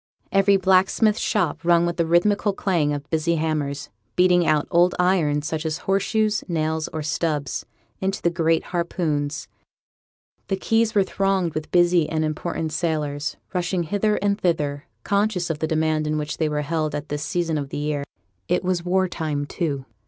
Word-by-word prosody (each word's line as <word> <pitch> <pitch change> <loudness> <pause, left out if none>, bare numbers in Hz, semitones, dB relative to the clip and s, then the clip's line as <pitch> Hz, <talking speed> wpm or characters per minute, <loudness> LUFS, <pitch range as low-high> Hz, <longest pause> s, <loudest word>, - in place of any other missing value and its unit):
Every 195 0 +4
blacksmith's 190 +3 +3
shop 210 - 0
rung 170 0 +4
with 170 0 -2
the 170 -2 +1
rhythmical 200 +5 +3
clang 170 -7 0
of 145 0 -4
busy 165 +1 +1
hammers, 150 -3 -2 0.2
beating 180 -2 +4
out 155 -1 +2
old 175 +1 +4
iron, 170 -5 +2
such 155 +1 -3
as 160 -1 -2
horseshoes, 210 +2 +1
nails 160 -2 -1
or 160 -2 -5
stubs, 155 -4 -2 0.3
into 195 +1 -1
the 170 - +1
great 165 -1 +1
harpoons; 155 -4 -1 1.0
the 195 - 0
quays 225 +2 +1
were 200 - +5
thronged 190 -3 0
with 155 0 -4
busy 175 -2 +3
and 155 -1 0
important 155 +1 -3
sailors, 150 -3 -2 0.2
rushing 180 -1 0
hither 205 +5 +1
and 205 0 +1
thither, 150 -4 0 0.2
conscious 200 -4 0
of 150 - -4
the 160 - 0
demand 155 -1 0
in 155 0 0
which 150 0 -3
they 155 -2 +1
were 150 0 -1
held 155 0 -1
at 145 +1 -5
this 145 0 -3
season 165 -1 -1
of 140 -1 -5
the - - -5
year. 145 -1 -1 0.4
It - - +1
was 180 -1 0
war 185 +1 +2
time, 155 -4 -3
too. 145 -4 -3
165 Hz, 175 wpm, -23 LUFS, 155-185 Hz, 1.0 s, were